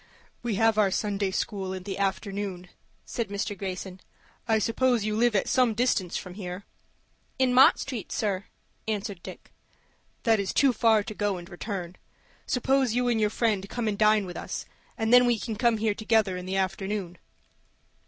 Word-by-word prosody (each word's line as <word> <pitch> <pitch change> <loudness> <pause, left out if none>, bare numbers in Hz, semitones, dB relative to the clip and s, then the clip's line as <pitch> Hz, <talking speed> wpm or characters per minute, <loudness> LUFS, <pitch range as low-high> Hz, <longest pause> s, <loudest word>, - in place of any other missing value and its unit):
"We 235 -3 -2
have 225 +1 +3
our 205 -2 +4
Sunday 200 0 -1
school 190 -1 -3
in 185 -1 -6
the 195 0 -5
afternoon," 195 -2 -3 0.4
said 235 -4 -3
Mr. 200 0 -3
Greyson. 185 -1 -6 0.5
"I 220 -1 +3
suppose 235 +1 +1
you 210 0 -1
live 235 0 +2
at 195 - +1
some 250 -4 +3
distance 210 -7 +1
from 180 - -7
here?" 185 0 -7 0.7
"In 260 -1 +2
Mott 260 +2 +7
Street, 250 -7 -5
sir," 200 -2 -1 0.4
answered 205 -3 -3
Dick. - - -11 0.7
"That 225 -2 +3
is 195 -1 -2
too 275 -3 +4
far 220 -2 +3
to 215 - -6
go 205 -2 -1
and 175 -1 -9
return. 180 -1 -6 0.5
Suppose 260 -1 +1
you 245 0 +2
and 225 -2 +1
your 210 - +3
friend 205 -3 0
come 240 -2 -2
and 210 - 0
dine 215 -1 +4
with 180 - -7
us, - - -5 0.3
and 225 0 +1
then 245 0 +8
we 240 -1 +3
can 220 +1 -4
come 235 0 +2
here 215 -1 +1
together 215 -3 +1
in 180 0 -6
the 190 +1 -1
afternoon." 190 -1 -2
210 Hz, 180 wpm, -27 LUFS, 190-230 Hz, 0.7 s, then